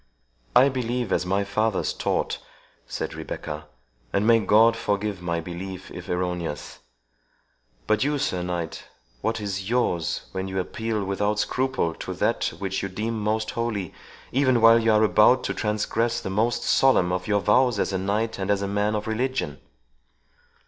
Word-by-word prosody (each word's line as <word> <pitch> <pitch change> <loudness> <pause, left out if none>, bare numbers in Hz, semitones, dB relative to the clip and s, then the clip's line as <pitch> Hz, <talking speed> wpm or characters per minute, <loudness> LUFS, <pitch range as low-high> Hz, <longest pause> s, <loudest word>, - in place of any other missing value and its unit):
"I 135 - +8
believe 125 -2 -2
as 90 - 0
my 100 +2 +1
fathers 110 0 0
taught," - - -1 0.5
said - - -4
Rebecca; 75 0 -6 0.4
"and 100 - +1
may 115 0 +6
God 110 +3 +5
forgive 105 -3 -2
my 85 -1 -1
belief 90 +2 -7
if 90 +1 -9
erroneous! 90 -4 -3 1.1
But 110 +1 +2
you, 145 +1 +1
Sir 90 -9 -1
Knight, 90 -2 -4 0.4
what 115 0 -1
is 100 -1 -4
yours, 90 -10 0
when 95 0 -3
you 95 0 -2
appeal 110 +3 -2
without 105 +2 0
scruple 130 -6 0
to - - -6
that - - 0
which 95 -1 -2
you 100 - -3
deem 110 +4 -3
most 110 +1 0
holy, 110 -6 -3 0.4
even 130 -2 +3
while 115 +1 +7
you 115 0 +3
are 110 0 +4
about 110 +4 +5
to - - -1
transgress 115 +2 0
the 95 - -5
most 110 +5 +1
solemn 110 -10 +4
of 90 0 -2
your 105 -1 +2
vows 120 +2 +3
as 100 - 0
a 95 - 0
knight, 105 +4 -1
and 95 +1 -3
as 100 -1 +2
a - - -1
man 105 +2 0
of 105 0 -2
religion?" 120 - -2
105 Hz, 165 wpm, -25 LUFS, 95-115 Hz, 1.1 s, I